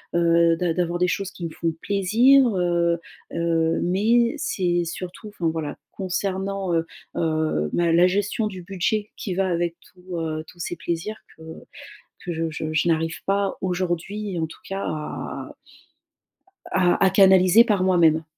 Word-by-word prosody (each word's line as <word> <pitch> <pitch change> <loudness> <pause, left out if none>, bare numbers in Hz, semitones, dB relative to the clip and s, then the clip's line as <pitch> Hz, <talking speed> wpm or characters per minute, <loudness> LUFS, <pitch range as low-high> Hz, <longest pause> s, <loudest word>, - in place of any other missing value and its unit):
heu, 170 0 +4
d’a 175 -2 0
d'avoir 175 0 -1
des 180 - +3
choses 195 +1 -2
qui 175 -3 -7
me - - -3
font 165 0 -2
plaisir, 230 +7 +4
heu 170 -1 +1 0.3
heu, 165 -1 +1
mais 230 - +2
c'est 175 -9 0
surtout 180 +5 -7
enfin 175 -5 -3
voilà, 160 -2 -4 0.2
concernant, 195 0 -2
heu 165 0 +1 0.3
heu, 155 - 0
ma 170 -1 +2
la 175 +2 +5
gestion 205 +3 0
du 190 -3 -7
budget 200 +3 -1
qui 190 - -4
va 190 +1 0
avec 170 -1 -1
tous, 180 -1 -10
heu, 155 -1 -3
tous 175 - -16
ces 175 +1 -3
plaisirs 170 +6 -4 0.2
que 160 - -19 0.8
que 175 - -3
je 165 0 -2
je 155 +1 -4
je 160 +2 +1
n'arrive 165 0 0
pas 200 0 0
aujourd'hui, 185 +2 -2
en 160 - 0
tout 160 - -14
cas 195 0 -3
à 155 -1 -5 1.2
à 185 0 +3
à 190 - +6
canaliser 190 +2 +6
par 205 -5 +1
moi-même. 165 -4 +4
180 Hz, 160 wpm, -23 LUFS, 165-195 Hz, 1.2 s, à